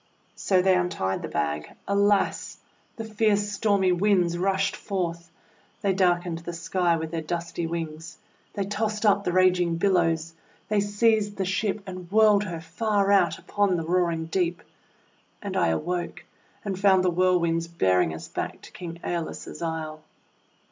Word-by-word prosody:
So 185 -2 +2
they 190 0 +4
untied 175 - -1
the - - -4
bag. 75 0 -3
Alas! 200 0 +1 0.4
The 225 - -6
fierce 210 -1 +1
stormy 200 -2 +2
Winds 180 -2 +2
rushed 195 +2 0
forth! 170 -4 -4 0.5
They 195 -1 +2
darkened 175 -2 +1
the 170 +1 -7
Sky 170 0 0
with 160 0 -5
their 165 -1 -2
dusky 170 +1 -3
wings. 165 -1 -5 0.4
They 200 - -1
tossed 210 +2 -2
up 205 -1 +4
the 180 - -1
raging 180 -2 +3
billows. 165 -3 +1 0.4
They 210 -1 +2
seized 205 0 +1
the 190 - -1
ship 200 +2 -1
and 185 -2 -8
whirled 210 -1 +5
her 170 -4 -5
far 200 +4 0
out 175 -5 +3
upon 200 -3 0
the 165 - -3
roaring 170 -1 +1
deep. 175 +1 -1 0.8
And - - -5
I 85 - +3
awoke 175 - -2 0.4
and 195 -2 -3
found 190 -2 +4
the 180 - +2
Whirlwinds 170 -2 +2
bearing 95 - +2
us 80 - -7
back - - -5
to - - -12
King 170 -1 -8
^Bolus's 170 -1 -4
isle! 160 -2 -4
180 Hz, 155 wpm, -26 LUFS, 165-200 Hz, 0.8 s, whirled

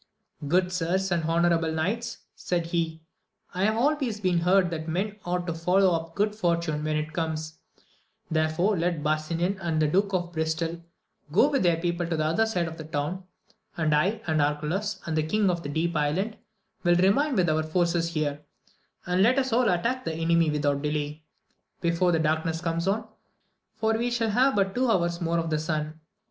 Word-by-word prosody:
Good 180 +4 +2
sirs, 185 +2 -1
and 170 -2 +1
honourable 165 0 +2
knights, 205 +9 -2 0.2
said 180 -6 -2
he, 165 -2 -2 0.5
I 185 +2 0
have 220 +1 +1
always 265 -3 +1
heard 180 -1 +2
that 160 -1 -4
men 195 +6 -2
ought 175 0 -1
to 170 - -2
follow 180 +3 +3
up 165 -1 -3
good 210 +1 +1
fortune 170 -6 0
when 155 0 -1
it 155 0 -3
comes; 160 -1 -3 0.7
therefore 155 +6 +1
let 170 -3 -1
Barsinan 165 +5 -1
and 165 -3 -1
the 155 - +3
Duke 195 +6 +1
of 175 -2 -1
Bristol 165 +1 -2 0.5
go 225 - +5
with 275 - +1
their 170 -2 +3
people 175 0 -1
to 165 -1 -1
the 155 - 0
other 195 +8 +2
side 180 -6 -1
of 165 0 -7
the - - -5
town, 155 +5 -3 0.5
and 155 -2 +1
I, 195 +9 +1
and 155 -2 +1
Arcalaus, 155 +8 -1
and 160 - -2
the 155 - +2
Eang 195 +5 +1
of 170 -1 -3
the 145 - -6
Deep 165 +3 -1
Island, 165 +9 0 0.5
will 175 -1 +4
remain 210 - +3
with 185 -4 +2
our 155 0 +2
forces 170 +1 0
here, 150 -1 -1 0.6
and 180 +1 +1
let 245 +6 +4
us 260 -3 +1
all 240 0 +3
attack 235 +9 0
the 160 - -3
enemy 165 0 +2
without 145 -1 0
delay, 150 +1 -3 0.6
before 170 +1 +2
the 165 - +2
darkness 160 +1 0
comes 165 +1 -2
on, 215 +3 0 0.7
for 220 0 +1
we 235 +2 0
shall 230 -2 0
have 260 +5 +3
but 195 -1 +1
two 255 +2 +1
hours 170 -4 +1
more 170 0 0
of 165 -1 -2
the 155 - +1
sun. 155 0 -3
170 Hz, 190 wpm, -26 LUFS, 160-195 Hz, 0.7 s, go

